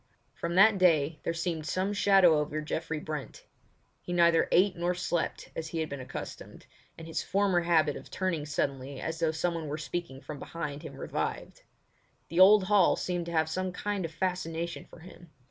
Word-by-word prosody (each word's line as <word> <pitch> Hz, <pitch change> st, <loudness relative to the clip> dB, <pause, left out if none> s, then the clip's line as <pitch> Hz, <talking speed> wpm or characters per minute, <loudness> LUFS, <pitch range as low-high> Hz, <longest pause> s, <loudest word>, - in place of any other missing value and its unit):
From 170 Hz, +1 st, -4 dB
that 200 Hz, +1 st, +6 dB
day 160 Hz, -4 st, +3 dB
there 165 Hz, -, -2 dB
seemed 165 Hz, -2 st, -3 dB
some 190 Hz, +5 st, -1 dB
shadow 195 Hz, -6 st, +5 dB
over 150 Hz, +1 st, -2 dB
Geoffrey 155 Hz, +1 st, -3 dB
Brent. 150 Hz, -2 st, -7 dB, 0.6 s
He 175 Hz, -, -5 dB
neither 170 Hz, -1 st, +4 dB
ate 185 Hz, +1 st, +4 dB
nor 175 Hz, +1 st, -1 dB
slept 175 Hz, -1 st, -2 dB
as 160 Hz, -, -4 dB
he 165 Hz, +1 st, -4 dB
had 160 Hz, -1 st, -2 dB
been 140 Hz, -, -5 dB
accustomed, 130 Hz, -, -8 dB, 0.3 s
and 165 Hz, -, -9 dB
his 165 Hz, -, -3 dB
former 190 Hz, -2 st, +1 dB
habit 160 Hz, -4 st, +2 dB
of -, -, -10 dB
turning 170 Hz, -6 st, -2 dB
suddenly 135 Hz, -2 st, -3 dB
as 165 Hz, 0 st, -4 dB
though 165 Hz, -1 st, +2 dB
someone 165 Hz, 0 st, -2 dB
were 145 Hz, +1 st, -3 dB
speaking 155 Hz, -2 st, -5 dB
from 150 Hz, 0 st, -8 dB
behind 150 Hz, -3 st, -5 dB
him 155 Hz, -4 st, -9 dB
revived. -, -, -4 dB, 0.7 s
The 170 Hz, -, -1 dB
old 200 Hz, +2 st, +8 dB
hall 200 Hz, -1 st, +4 dB
seemed 175 Hz, -2 st, -3 dB
to -, -, -4 dB
have 160 Hz, -1 st, +2 dB
some 185 Hz, +3 st, -2 dB
kind 200 Hz, +1 st, -3 dB
of 165 Hz, -, -4 dB
fascination 170 Hz, -1 st, -3 dB
for -, -, -15 dB
him. 175 Hz, 0 st, -14 dB
170 Hz, 185 wpm, -29 LUFS, 155-180 Hz, 0.7 s, old